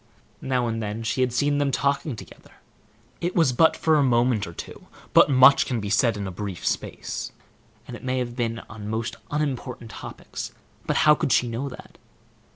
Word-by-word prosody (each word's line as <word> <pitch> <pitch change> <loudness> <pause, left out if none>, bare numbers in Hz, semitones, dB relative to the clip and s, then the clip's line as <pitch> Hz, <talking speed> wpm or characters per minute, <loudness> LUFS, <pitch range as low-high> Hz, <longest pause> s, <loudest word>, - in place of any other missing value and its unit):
Now 125 -2 0
and 115 -1 -2
then 105 +1 -4
she 115 +3 -1
had 125 -1 +2
seen 145 +3 +1
them 145 -1 +2
talking 140 0 0
together; - - -13 0.7
it 175 +1 -2
was 160 -7 +4
but 160 +6 +4
for 160 -1 +3
a - - +4
moment 120 -4 +2
or - - -7
two, - - -10 0.3
but - - +7
much 135 +1 +6
can 125 -3 -1
be 100 -1 -4
said 110 +1 +3
in 100 - -4
a 95 - -4
brief 95 -1 -6
space; - - -3 0.6
it - - -9
may 130 0 -1
have 120 -1 -3
been 115 -2 -2
on 110 -1 -9
most 115 +1 -3
unimportant 130 -5 -3
topics, - - -8 0.3
but - - +1
how 150 - +8
could 140 - -1
she 120 - +3
know 120 +4 -3
that? 125 - -13
125 Hz, 190 wpm, -25 LUFS, 115-140 Hz, 0.7 s, how